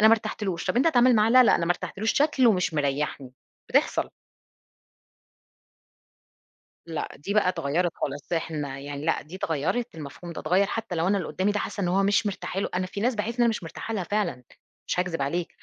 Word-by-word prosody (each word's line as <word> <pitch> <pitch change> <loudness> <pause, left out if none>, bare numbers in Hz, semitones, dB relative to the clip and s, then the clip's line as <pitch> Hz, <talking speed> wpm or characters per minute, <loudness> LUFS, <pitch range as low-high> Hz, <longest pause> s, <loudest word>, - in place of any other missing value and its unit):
أنا 220 - +8
ما 225 - +7
ارتحتلوش." 200 -5 -4
طب - - 0
أنت 260 - +4
اتعامل 250 -5 +5
معاه، 215 +1 +4
"لا 255 +1 +8
لأ، - - +5
أنا 170 - 0
ما 175 - +4
ارتحتلوش، 215 +5 -2
شكله 275 -5 +4
مش 180 -4 0
مريحني." 140 -2 -1 0.4
بتحصَل. - - +1 2.8
لأ، 165 -2 -3
دي 200 +8 -4
بقى 210 -3 +4
إتغيَّرِت 170 0 0
خالص. 145 +4 -5
إحنا 150 -5 -2
يعني 145 +1 -6
لأ، 165 - +1
دي 155 +5 -10
إتغيَّرِت، 190 - -1
المفهوم 160 +3 -8
ده - - -6
إتغيَّر، 185 +5 +2
حتى 225 -3 -4
لو 165 +1 0
أنا 200 +1 +2
اللي 180 - -4
قدامي 195 +2 0
ده 210 - 0
حاسَّة 205 - -4
إن 175 - +1
هو 195 +2 +2
مش 205 +2 +2
مرتاحة 195 -1 -3
له، - - -1
أنا 185 0 0
في 200 +2 -6
ناس 245 +4 +1
باحس 210 0 -2
إن 245 - -3
أنا 235 - +5
مش 220 - -1
مرتاحة 200 +6 -6
لها 190 -4 -2
فعلًا، 205 -12 -1 0.5
مش - - +1
هاكذب 170 -5 -2
عليك، 170 +5 -1
185 Hz, 205 wpm, -26 LUFS, 160-215 Hz, 2.8 s, أنا